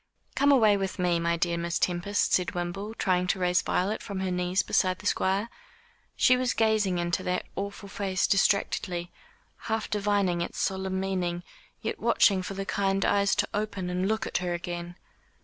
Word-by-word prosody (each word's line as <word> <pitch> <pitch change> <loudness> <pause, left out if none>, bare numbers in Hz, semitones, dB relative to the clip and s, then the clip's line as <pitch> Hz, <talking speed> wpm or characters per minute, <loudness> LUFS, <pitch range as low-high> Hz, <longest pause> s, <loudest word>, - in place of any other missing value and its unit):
"Come 285 +1 +3
away 220 -7 +5
with 195 0 -3
me, 175 -2 +1
my 170 0 0
dear 170 0 0
Miss 170 0 -1
Tempest," 185 +3 0
said 180 +1 +1
Wimble, 195 +5 -4
trying 180 -3 +1
to 185 - 0
raise 180 0 +2
Violet 200 +4 -1
from 200 -3 -5
her 190 -1 -1
knees 180 +1 0
beside 185 -1 +1
the 205 - -14
Squire. 195 +1 +1 0.7
She 255 - +5
was 250 -1 0
gazing 215 -5 +2
into 175 +1 -1
that 180 0 -2
awful 200 +1 -5
face 195 -1 -1
distractedly 180 -3 +1 0.6
half 220 -1 -1
divining 200 -4 +1
its 170 - -4
solemn 190 0 -1
meaning 180 -2 -2 0.4
yet - - -3
watching 195 -3 +3
for 195 +2 -6
the 195 0 -4
kind 195 0 0
eyes 200 -1 +3
to 205 0 +1
open 200 -3 -2
and 180 +1 0
look 220 +1 0
at - - -1
her 175 -1 -2
again. 175 0 -6
190 Hz, 180 wpm, -27 LUFS, 180-200 Hz, 0.7 s, away